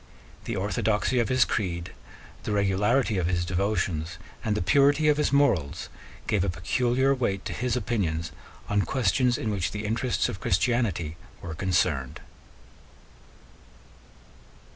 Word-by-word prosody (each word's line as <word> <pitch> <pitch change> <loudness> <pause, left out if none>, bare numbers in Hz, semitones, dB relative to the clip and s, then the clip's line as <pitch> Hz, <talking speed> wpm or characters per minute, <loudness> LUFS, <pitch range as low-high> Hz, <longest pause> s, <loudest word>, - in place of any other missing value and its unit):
The - - -3
orthodoxy 105 +4 0
of 120 - +1
his 130 -1 +4
creed, 90 -4 -2 0.5
the - - -4
regularity 105 +3 +2
of 85 - 0
his 85 -1 0
devotions, 90 -3 -1 0.3
and 105 -1 0
the - - -1
purity 145 - +4
of 150 - +3
his 150 - +1
morals 120 - +1 0.4
gave 100 -4 +1
a 100 - 0
peculiar 125 +10 +1
weight 100 -7 -1
to - - -3
his 125 -1 -1
opinions 85 -9 -1 0.4
on 105 0 +2
questions 120 +4 +1
in 110 - -2
which 95 -3 -1
the 105 +2 -5
interests 115 +3 0
of 95 - -5
Christianity 95 -6 0 0.2
were 85 -2 -6
concerned. 80 -7 0
105 Hz, 135 wpm, -26 LUFS, 90-120 Hz, 0.5 s, his